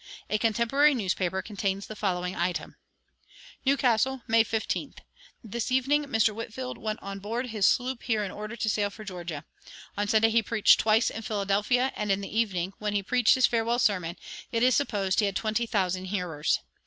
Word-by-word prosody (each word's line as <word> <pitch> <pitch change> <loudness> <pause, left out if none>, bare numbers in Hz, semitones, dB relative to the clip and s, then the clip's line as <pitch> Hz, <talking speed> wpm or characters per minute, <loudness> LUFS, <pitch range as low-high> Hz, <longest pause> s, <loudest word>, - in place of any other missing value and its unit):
A 215 - +1
contemporary 240 +7 +3
newspaper 190 -3 -1
contains 200 -2 -3
the 215 - -8
following 180 -3 -2
item: 175 0 -2 0.9
"New 275 +1 +4
Castle, 255 0 +1
May 225 0 +5
15th. 220 -1 -3 0.5
This 235 +2 -4
evening 275 +3 +2
Mr. 225 -5 +2
Whitefield 230 +4 -6
went 215 0 -3
on 195 0 -6
board 230 +6 -3
his 215 -3 +2
sloop 255 -1 +1
here 220 -3 0
in 195 - -4
order 215 +2 -6
to 220 - -3
sail 205 -1 +1
for 210 +2 -11
Georgia. 175 -6 -6 0.5
On 205 0 -1
Sunday 220 +1 +4
he 230 +1 +4
preached 220 -1 +4
twice 220 +1 +3
in 225 - -6
Philadelphia, 210 +4 0
and 210 -1 -1
in 195 +1 +1
the 200 - -7
evening, 195 -5 0
when 210 -1 -2
he 200 -1 0
preached 245 +2 +4
his 260 -2 +4
farewell 230 0 +1
sermon, 180 -7 0 0.3
it 230 0 +1
is 255 -1 +5
supposed 200 -9 0
he 210 - +3
had 195 - -3
twenty 220 +2 -1
thousand 185 -3 -1
hearers. 175 - -1
215 Hz, 185 wpm, -27 LUFS, 195-235 Hz, 0.9 s, May